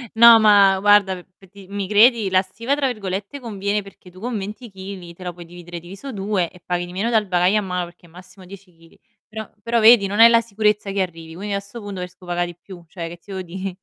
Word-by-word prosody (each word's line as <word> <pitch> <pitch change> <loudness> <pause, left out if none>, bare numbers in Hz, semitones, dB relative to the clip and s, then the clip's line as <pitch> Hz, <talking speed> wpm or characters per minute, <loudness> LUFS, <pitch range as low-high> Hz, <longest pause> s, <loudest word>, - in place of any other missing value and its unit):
No, 230 0 +9
ma 200 -2 +6
guarda, 200 -3 +3
p - - -36
pe' 195 - -19
di 200 -1 -15
mi 200 -1 -4
credi? 215 0 +4
La 185 0 +3
"stiva" 230 +8 -3
tra 285 -2 0
virgolette 200 +2 -5
conviene 205 -3 -2
perché 195 -2 -16
tu 185 - -15
con 235 0 -3
20 210 +4 -7
chili 190 -3 -9
te 185 - -13
la 180 - -4
puoi 175 0 -12
dividere 175 0 -10
diviso 195 +11 -9
2 195 -5 -1
e 180 - -17
paghi 175 0 -3
di 175 - -11
meno 200 +6 -2
dal 220 -3 +1
bagaglio 180 +3 +2
a - - -2
mano, 180 -2 -3
perché 175 0 -17
è - - -21
massimo 185 +2 -15
10 185 -1 -14
chili. 165 0 -22 0.3
Però 220 -1 -7
però 235 0 +1
vedi, 220 -2 +7
non 205 +3 -3
hai 230 +1 +10
la 230 0 +4
sicurezza 210 -2 0
che 195 -1 -1
arrivi, 165 -3 -6
quindi 200 +2 -5
a 200 - -1
'sto 200 +4 -11
punto 200 -3 -7
preferisco 180 0 -10
paga' 175 0 -1
di 175 -1 -7
più, 180 -3 -12
cioè 170 -2 -6
che 170 +1 -9
ti 200 - -14
devo 190 - -4
dì? 185 +1 -6
195 Hz, 255 wpm, -21 LUFS, 180-210 Hz, 0.3 s, hai